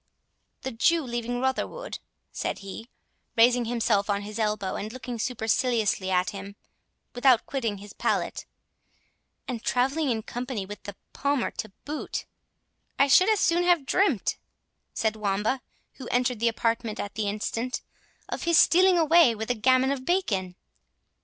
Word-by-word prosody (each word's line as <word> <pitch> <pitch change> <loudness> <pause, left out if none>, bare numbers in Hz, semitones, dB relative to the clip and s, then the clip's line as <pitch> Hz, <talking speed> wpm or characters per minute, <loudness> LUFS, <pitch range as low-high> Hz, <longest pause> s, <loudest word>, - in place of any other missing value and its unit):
"The 265 - -3
Jew 320 +8 +2
leaving 240 -1 -3
Rotherwood," 265 - -2 0.3
said - - -3
he, 220 +5 -8 0.5
raising 240 +1 +5
himself 225 -3 +1
on 200 0 0
his 210 +2 -7
elbow, 210 -3 -1
and 215 +2 -4
looking 245 -1 -6
superciliously 220 -4 0
at 180 0 +1
him 200 0 -8 0.6
without 245 -1 +4
quitting 230 -7 -2
his 205 +1 -11
pallet, - - -1 1.0
"and 245 -3 -4
travelling 270 +4 +1
in 225 -3 -1
company 245 -3 -4
with 205 +2 -9
the 205 - -7 0.2
Palmer 280 -3 0
to 220 - -6 0.2
boot—" 300 +1 -4 0.7
"I 275 - +5
should 365 +9 +6
as 430 -2 +3
soon 345 +1 +3
have 350 -5 +3
dreamt," 315 - +1 0.5
said 220 -1 -1
Wamba, 215 +4 -1 0.4
who 260 - -8
entered 245 -1 0
the 235 - +2
apartment 230 -1 -1
at 205 - -4
the 215 -2 -2
instant, 225 +4 -3 0.4
"of - - -4
his 340 -1 +4
stealing 365 +3 +6
away 320 -6 +5
with 220 +2 -3
a - - +3
gammon 255 +3 +3
of 270 -2 -3
bacon." 200 - 0
240 Hz, 150 wpm, -26 LUFS, 215-270 Hz, 1.0 s, should